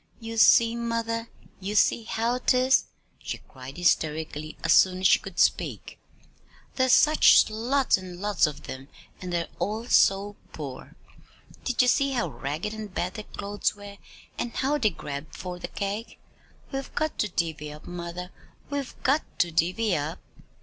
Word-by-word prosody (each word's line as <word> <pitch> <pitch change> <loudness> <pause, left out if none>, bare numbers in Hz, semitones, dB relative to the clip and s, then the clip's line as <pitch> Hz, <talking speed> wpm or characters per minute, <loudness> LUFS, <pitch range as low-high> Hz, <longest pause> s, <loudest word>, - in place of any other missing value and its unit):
"You 225 -1 -6
see, 230 +1 +6
mother, 230 -1 -2 0.3
you 200 +2 -4
see 220 +2 +3
how 235 +3 -1
'tis," 255 +1 +3 0.4
she - - -4
cried 130 +1 -12
hysterically, 155 -2 0
as 165 - +4
soon 185 -1 +4
as - - -2
she - - +5
could 195 -2 -10
speak. - - 0 0.7
"There's 260 -1 +2
such 305 +4 +6
lots 245 +5 +2
and 180 -1 -9
lots 205 -5 +2
of 150 - -7
them, 130 +1 -8 0.3
and 180 -1 -5
they're 170 -1 -1
all 215 +3 -2
so 200 -3 +3 0.2
poor. 140 -4 -8 0.7
Did 250 -1 +2
you - - +2
see 275 +2 +3
how 240 - 0
ragged 150 +10 -4
and 215 -2 -7
bad 180 0 -2
their 215 -2 -7
clothes 205 +1 -2
were, 205 0 -11 0.4
and 240 - -2
how 290 +3 +1
they 220 -5 +3
grabbed 145 -3 -7
for 180 -1 -6
the - - -5
cake? 205 +3 -4 0.5
We've 270 -1 -4
got 310 0 -1
to 210 - +1
divvy 160 -4 -3
up, 150 +1 -12
mother, 175 +1 -6 0.4
we've 285 -2 -3
got 285 +4 +3 0.2
to 170 -2 0
divvy 180 +5 +1
up!" 155 +4 -3
205 Hz, 165 wpm, -26 LUFS, 170-235 Hz, 0.7 s, see